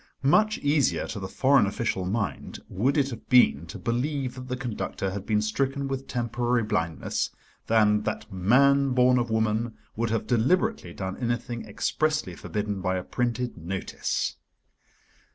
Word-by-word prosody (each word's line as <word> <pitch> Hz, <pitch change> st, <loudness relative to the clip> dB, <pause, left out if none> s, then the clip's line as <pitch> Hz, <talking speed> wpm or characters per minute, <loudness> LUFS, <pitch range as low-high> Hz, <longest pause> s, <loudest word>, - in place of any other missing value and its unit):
Much 215 Hz, +10 st, +4 dB
easier 145 Hz, -1 st, +1 dB
to 105 Hz, -, -5 dB
the 95 Hz, -, -4 dB
foreign 135 Hz, -1 st, +3 dB
official 100 Hz, -3 st, -1 dB
mind 100 Hz, -6 st, -3 dB
would 130 Hz, +11 st, 0 dB
it 140 Hz, -1 st, +2 dB
have 115 Hz, -, -9 dB
been 85 Hz, -, +5 dB
to -, -, -7 dB
believe 130 Hz, +2 st, -1 dB
that 130 Hz, 0 st, -9 dB
the 125 Hz, 0 st, -3 dB
conductor 110 Hz, -5 st, -3 dB
had 100 Hz, 0 st, -6 dB
been 105 Hz, -1 st, +2 dB
stricken 135 Hz, +5 st, -1 dB
with 135 Hz, 0 st, -4 dB
temporary 120 Hz, 0 st, 0 dB
blindness, 80 Hz, -7 st, -1 dB, 0.4 s
than 105 Hz, -2 st, +4 dB
that 105 Hz, -, -4 dB
man 135 Hz, +8 st, +4 dB
born 125 Hz, 0 st, +4 dB
of 120 Hz, -1 st, -1 dB
woman 110 Hz, +1 st, 0 dB, 0.2 s
would 115 Hz, +1 st, -1 dB
have 115 Hz, 0 st, -1 dB
deliberately 180 Hz, -, +1 dB
done 95 Hz, -1 st, -4 dB
anything 120 Hz, -1 st, -2 dB
expressly 155 Hz, +8 st, -1 dB
forbidden 105 Hz, -2 st, -3 dB
by 95 Hz, +1 st, 0 dB
a 90 Hz, -, -2 dB
printed 120 Hz, +1 st, -2 dB
notice. 90 Hz, +4 st, -3 dB
120 Hz, 155 wpm, -26 LUFS, 105-135 Hz, 0.4 s, been